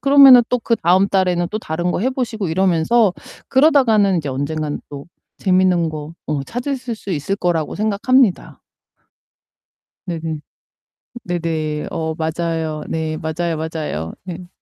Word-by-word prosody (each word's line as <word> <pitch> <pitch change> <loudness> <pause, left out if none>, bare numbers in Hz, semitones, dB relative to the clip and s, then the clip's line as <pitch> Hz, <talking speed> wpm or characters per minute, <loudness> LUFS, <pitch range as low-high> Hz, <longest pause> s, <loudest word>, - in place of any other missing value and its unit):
그러면은 275 -3 +8
또 250 - +1
그다음 195 -5 +2
달에는 180 -3 +1
또 215 - -1
다른 175 0 -2
거 - - -2
해 255 +5 +1
보시고 225 -7 -3
이러면서 190 +4 +2 0.4
그러다가는 255 - +4
인제 150 -4 -2
언젠가는 145 +3 -3
또 140 -1 -8 0.3
재밌는 185 -3 +2
거 155 +1 -7
어 150 -2 -2
찾으실 245 - -4
수 200 - -8
있을 160 +6 -2
거라고 175 -5 -1
생각합니다. 215 +1 +1 1.4
네네. 165 -2 -3
어 150 - -8 0.8
네네. 160 -3 -2
어 160 -1 -3
맞아요. 160 -1 -2
네 160 -1 -3
맞아요, 160 +1 -2
맞아요. 155 - -4
네. 180 -1 -8
175 Hz, 290 characters per minute, -19 LUFS, 160-215 Hz, 1.4 s, 그러면은